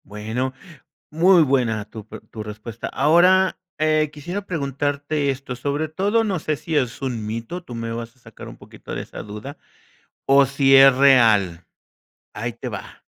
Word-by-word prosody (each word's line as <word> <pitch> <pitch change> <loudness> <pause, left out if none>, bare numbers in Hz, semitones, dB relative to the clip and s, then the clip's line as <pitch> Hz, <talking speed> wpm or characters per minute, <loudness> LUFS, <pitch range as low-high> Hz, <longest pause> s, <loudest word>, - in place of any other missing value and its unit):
Bueno, 110 +6 -4 0.6
muy 170 +2 +5
buena 120 -7 0
tu 110 0 -11
pre - - -10
tu 110 - -7
respuesta. 110 +2 -7
Ahora, 180 +6 +3 0.2
eh, 155 -1 +2
quisiera 175 +7 -6
preguntarte 145 -1 -2
esto, 135 -2 -4
sobre 145 +5 -2
todo, 200 +8 +1
no 195 -5 -1
sé, 155 0 -2
si 160 +2 -5
es 130 -3 -1
un 120 -5 -3
mito, 115 +11 -5
tú 125 - -9
me 115 0 -4
vas 115 0 -6
a - - -29
sacar 115 -3 -12
un - - -11
poquito - - -10
de - - -4
esa - - -9
duda, 105 +8 -9 0.7
o 140 +1 +6
si 135 0 +4
es 135 -1 +8
real, 110 -10 +4 0.7
ahí 120 +2 -4
te 120 +2 -7
va. 100 -4 -9
135 Hz, 170 wpm, -22 LUFS, 115-155 Hz, 0.7 s, es